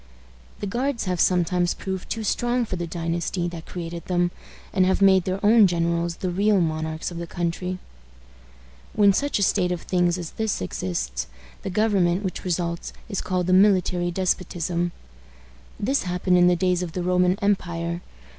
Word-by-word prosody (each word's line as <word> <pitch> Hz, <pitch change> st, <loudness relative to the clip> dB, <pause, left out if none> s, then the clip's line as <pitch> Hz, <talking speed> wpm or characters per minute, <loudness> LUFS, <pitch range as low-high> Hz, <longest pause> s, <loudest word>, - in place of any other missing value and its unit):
The -, -, -2 dB
guards 245 Hz, +5 st, -1 dB
have 180 Hz, -2 st, -1 dB
sometimes 175 Hz, 0 st, +2 dB
proved 190 Hz, -1 st, -5 dB
too 225 Hz, -, -3 dB
strong 240 Hz, +3 st, 0 dB
for 200 Hz, -, -4 dB
the 175 Hz, -1 st, -4 dB
dynasty 170 Hz, +1 st, -2 dB
that 170 Hz, -1 st, -9 dB
created 170 Hz, -1 st, -6 dB
them, 175 Hz, -1 st, +1 dB, 0.4 s
and 185 Hz, -, +3 dB
have 190 Hz, +1 st, +2 dB
made 190 Hz, -2 st, +5 dB
their 190 Hz, +1 st, -1 dB
own 215 Hz, -1 st, +7 dB
generals 170 Hz, -1 st, 0 dB
the 185 Hz, 0 st, -3 dB
real 200 Hz, +2 st, +3 dB
monarchs 160 Hz, 0 st, -2 dB
of 170 Hz, -, -6 dB
the 170 Hz, -, -5 dB
country. 175 Hz, +2 st, -3 dB, 1.2 s
When 205 Hz, -2 st, +5 dB
such 285 Hz, +7 st, 0 dB
a 200 Hz, -, +1 dB
state 185 Hz, -2 st, +2 dB
of 175 Hz, -2 st, -3 dB
things 175 Hz, -1 st, +1 dB
as 170 Hz, -3 st, -6 dB
this 220 Hz, -2 st, -2 dB
exists, 85 Hz, -10 st, -3 dB, 0.3 s
the -, -, -4 dB
government 195 Hz, -3 st, +2 dB
which 190 Hz, -, -4 dB
results 170 Hz, -2 st, -2 dB, 0.2 s
is 195 Hz, -, -2 dB
called 180 Hz, -1 st, -1 dB
a 185 Hz, -, +3 dB
military 185 Hz, -2 st, +4 dB
despotism. 175 Hz, -1 st, -1 dB, 0.9 s
This 270 Hz, +7 st, +1 dB
happened 180 Hz, 0 st, +1 dB
in 175 Hz, -, +6 dB
the 180 Hz, -, +4 dB
days 180 Hz, 0 st, +1 dB
of 175 Hz, -3 st, -4 dB
the 180 Hz, -, -2 dB
Roman 180 Hz, +1 st, +2 dB
empire. 170 Hz, -4 st, -1 dB
180 Hz, 170 wpm, -24 LUFS, 170-195 Hz, 1.2 s, own